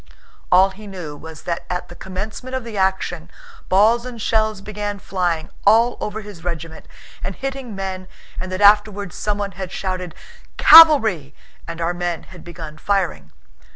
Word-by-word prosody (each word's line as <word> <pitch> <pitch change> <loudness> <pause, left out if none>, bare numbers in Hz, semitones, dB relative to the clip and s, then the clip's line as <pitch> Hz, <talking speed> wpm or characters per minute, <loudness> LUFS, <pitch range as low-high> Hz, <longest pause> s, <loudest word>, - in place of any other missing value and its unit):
All 190 +2 +6
he 210 +2 -12
knew 175 -7 -7
was 160 +1 -11
that 170 -1 -3
at 180 0 -3
the - - -12
commencement 210 +7 -6
of 260 - -3
the 230 -2 -8
action 190 -1 -1 0.4
balls 220 +5 +4
and 245 -2 -8
shells 215 -1 0
began 205 0 -5
flying 175 -5 -2
all 230 +4 +4
over 210 +1 -4
his 200 -6 -11
regiment 165 -2 -6 0.4
and 190 - -4
hitting 270 -5 -5
men 190 -1 -5 0.3
and 185 0 -5
that 185 +2 -3
afterwards 205 -2 +4
someone 205 -1 -2
had 185 0 -7
shouted 185 -3 -4 0.4
"Cavalry!" 220 - +7 0.3
and 170 0 -6
our 170 +1 0
men 175 -2 -3
had 185 - -14
begun 160 -3 -9
firing. 180 - -1
190 Hz, 155 wpm, -20 LUFS, 175-215 Hz, 0.4 s, Cavalry